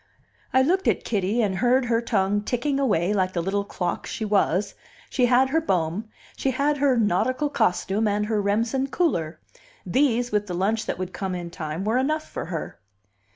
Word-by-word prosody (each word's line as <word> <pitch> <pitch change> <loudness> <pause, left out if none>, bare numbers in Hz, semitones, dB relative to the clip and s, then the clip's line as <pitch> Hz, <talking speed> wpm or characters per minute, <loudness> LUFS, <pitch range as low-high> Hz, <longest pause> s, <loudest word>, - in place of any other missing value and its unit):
I 260 - +4
looked 370 +7 +1
at - - +2
Kitty, 210 +2 0
and 190 -3 0
heard 250 +4 +3
her 230 -1 +1
tongue 205 -3 +1
ticking 260 +6 -1
away, 200 -8 +1
like 185 -2 0
the 170 - 0
little 200 +2 0
clock 180 -3 -3
she 220 - -4
was; 200 -1 +1 0.4
she 250 -2 +3
had 255 +2 +3
her 320 +2 +2
Bohm, 185 - -1 0.3
she 270 - -1
had 280 +3 +1
her 275 -3 +3
nautical 235 +8 +1
costume 210 -1 +1
and 210 0 0
her 215 -1 0
Remsen 225 +6 0
cooler. 170 - -1 0.5
These, 245 +3 +1
with 210 0 0
the 180 - -4
lunch 210 +5 0
that - - -2
would 185 0 -5
come 190 -2 -3
in 175 -1 -6
time, 160 +3 -4
were 225 +4 +2
enough 305 +4 -1
for - - -5
her. 165 -1 -5
215 Hz, 190 wpm, -24 LUFS, 190-255 Hz, 0.5 s, I